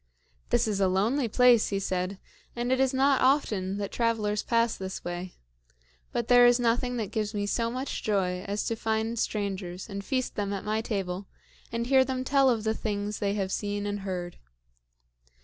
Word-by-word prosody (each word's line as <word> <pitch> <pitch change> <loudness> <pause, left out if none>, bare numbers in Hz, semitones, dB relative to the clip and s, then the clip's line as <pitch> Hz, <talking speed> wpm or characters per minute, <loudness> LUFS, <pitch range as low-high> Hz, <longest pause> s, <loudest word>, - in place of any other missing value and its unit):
"This 240 -1 +2
is 205 -2 -1
a 195 - +4
lonely 225 +8 +1
place," 245 0 +5
he 200 - -1
said, 185 0 -2 0.4
"and 240 +1 -1
it 260 - +2
is 265 -1 +3
not 270 0 +3
often 210 -8 +2
that 200 -1 -4
travelers 215 -3 0
pass 230 -1 +1
this 190 0 -6
way. 175 +1 -5 0.8
But 235 - -2
there 245 0 +7
is 245 0 +4
nothing 245 +1 +1
that 215 -4 -3
gives 215 0 -2
me 205 0 -1
so 230 +3 0
much 255 +3 -4
joy 185 -4 0
as 205 +1 -2
to 230 - -1
find 220 +1 -1
strangers 195 -4 -3
and 200 -2 -6
feast 255 +3 -1
them 205 -1 -2
at 195 - -5
my 215 +1 0
table 195 -3 -3 0.4
and 230 0 -2
hear 265 +1 +5
them 260 0 -3
tell 270 0 +4
of 225 -4 +1
the 220 0 +1
things 210 -1 -3
they 200 0 0
have 195 -2 -2
seen 205 0 -2
and 205 0 -2
heard. 180 -3 -5
215 Hz, 190 wpm, -28 LUFS, 200-240 Hz, 0.8 s, there